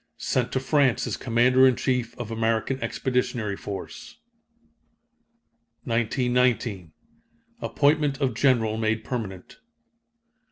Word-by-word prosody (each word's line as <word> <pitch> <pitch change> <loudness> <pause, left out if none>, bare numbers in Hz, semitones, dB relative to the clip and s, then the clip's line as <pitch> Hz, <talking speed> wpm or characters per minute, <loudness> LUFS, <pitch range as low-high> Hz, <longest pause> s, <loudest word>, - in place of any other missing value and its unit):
Sent 125 -1 -1
to 130 - 0
France 135 -2 +2
as - - -2
commander 125 +2 +4
in 130 - +3
chief 120 -2 -2
of 120 -2 -6
American 115 +4 -1
Expeditionary 125 -5 -1
Force. 100 -1 -8 1.7
1919. 120 - 0 0.7
Appointment 145 -1 +1
of 135 -4 0
general 115 -3 +2
made 110 0 -1
permanent. 105 -7 -6
120 Hz, 95 wpm, -25 LUFS, 110-130 Hz, 1.7 s, commander